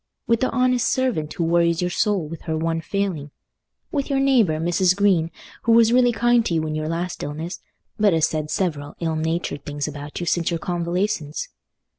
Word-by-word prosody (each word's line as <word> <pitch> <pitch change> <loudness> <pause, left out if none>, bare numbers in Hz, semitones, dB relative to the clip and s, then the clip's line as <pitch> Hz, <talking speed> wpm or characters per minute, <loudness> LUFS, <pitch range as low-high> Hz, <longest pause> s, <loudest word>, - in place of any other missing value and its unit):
With 230 -1 +2
the 255 - +1
honest 255 -1 +2
servant 240 - 0
who 170 - -2
worries 170 0 +2
your 180 0 0
soul 195 -4 0
with 165 +1 -8
her 160 - 0
one 165 0 -1
failing? 175 -5 -2 0.6
With 280 -2 -2
your 275 -1 +1
neighbour, 245 - +3
Mrs. 175 +2 +2
Green, 190 -5 +3 0.3
who 230 - +3
was 230 0 +5
really 245 -1 +5
kind 240 +1 +3
to 170 - 0
you 160 -1 0
in 155 - -3
your 155 0 -2
last 170 +2 -3
illness, 160 +5 -5 0.4
but 210 -1 +5
has 160 -2 +3
said 155 -1 -3
several 150 -5 -2
ill 165 -2 -1
natured 160 -2 -2
things 145 0 -4
about 145 0 -7
you 175 - -3
since 170 0 +1
your 170 - -1
convalescence? 175 -2 -2
170 Hz, 195 wpm, -22 LUFS, 155-210 Hz, 0.6 s, was